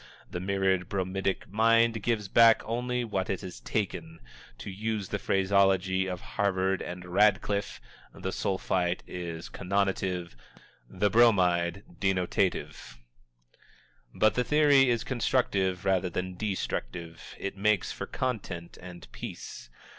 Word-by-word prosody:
The 90 - -3
mirrored 95 -1 0
bromidic 95 0 -2
mind 115 +1 +3
gives 105 -2 -1
back 115 +2 +6
only 125 +2 -1
what 100 -5 -2
it 95 - -2
has 90 -2 -8
taken. 85 -6 -3 0.4
To 100 - -7
use 105 0 -3
the 100 - -2
phraseology 95 -1 +2
of 90 -1 -4
Harvard 95 -2 0
and 90 0 -6
Radcliffe, 100 +2 +1 0.3
the - - -5
Sulphite 90 -2 -1
is 85 -2 -6
connotative, 95 -4 -1 0.5
the 105 -1 0
Bromide 95 -5 +3 0.2
denotative. 95 -8 -1 1.1
But 110 - +3
the 125 - +1
theory 140 0 +5
is 120 -1 +1
constructive 100 -7 0
rather 95 -1 +2
than 90 +1 -3
destructive. 85 - -4
It 100 - -4
makes 100 -1 +1
for - - -6
content, 100 -9 -4
and 90 -1 -10
peace. - - -8
95 Hz, 120 wpm, -29 LUFS, 90-110 Hz, 1.1 s, back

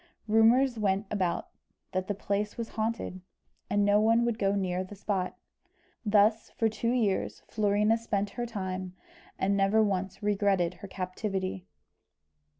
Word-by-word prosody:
Rumours 230 +3 +4
went 200 0 +1
about 185 -5 -1 0.4
that 185 0 -2
the 205 - -1
place 205 +1 -2
was 230 -1 -4
haunted, 220 -4 -3 0.5
and 205 0 +2
no 205 +1 +4
one 230 +2 +4
would 235 -1 -1
go 195 0 +2
near 185 -2 -1
the 190 +2 -10
spot. 190 -2 -2 0.7
Thus, 215 +1 +3
for 225 - 0
two 225 +1 -1
years, 225 -6 0
Florina 210 +1 +2
spent 205 -3 -1
her 240 -1 -4
time, 185 -4 -4 0.4
and 195 +1 +1
never 200 +3 +4
once 195 -1 -2
regretted 195 -4 +2
her 200 - -7
captivity. 190 0 -4
205 Hz, 145 wpm, -29 LUFS, 190-220 Hz, 0.7 s, Rumours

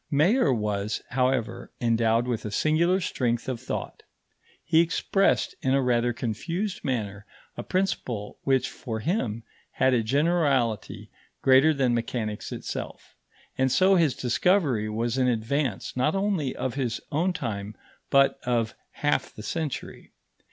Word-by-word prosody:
Mayer 155 - +3
was, 105 -3 -1
however, 125 -2 -1
endowed 115 0 +2
with 120 -3 -2
a 105 - -4
singular 165 - +2
strength 120 -9 -1
of 125 -3 -3
thought; - - -5 0.6
he 160 0 +3
expressed 165 - +1
in 130 0 +2
a 135 - +3
rather 120 -1 +2
confused 175 - -3
manner 105 - -3 0.3
a - - -4
principle 150 - -2
which, 130 -2 +2
for 110 -4 -6
him, 115 - -1 0.3
had 130 0 +3
a 120 - +3
generality 140 - 0 0.3
greater 135 +4 +6
than 135 -5 +1
mechanics 115 -2 -3
itself, - - -6 0.4
and 130 0 +3
so 185 +7 +4
his 160 -8 +3
discovery 130 - +1
was 115 +3 -1
in 130 - +3
advance 125 0 -1
not 140 +7 +1
only 195 -9 0
of 130 -1 -2
his 125 -4 -2
own 165 +5 +1
time 105 - -4 0.3
but 140 0 +4
of 115 -3 0 0.3
half 145 - +1
the 105 - -10
century. 155 +3 -5
130 Hz, 135 wpm, -26 LUFS, 115-155 Hz, 0.6 s, greater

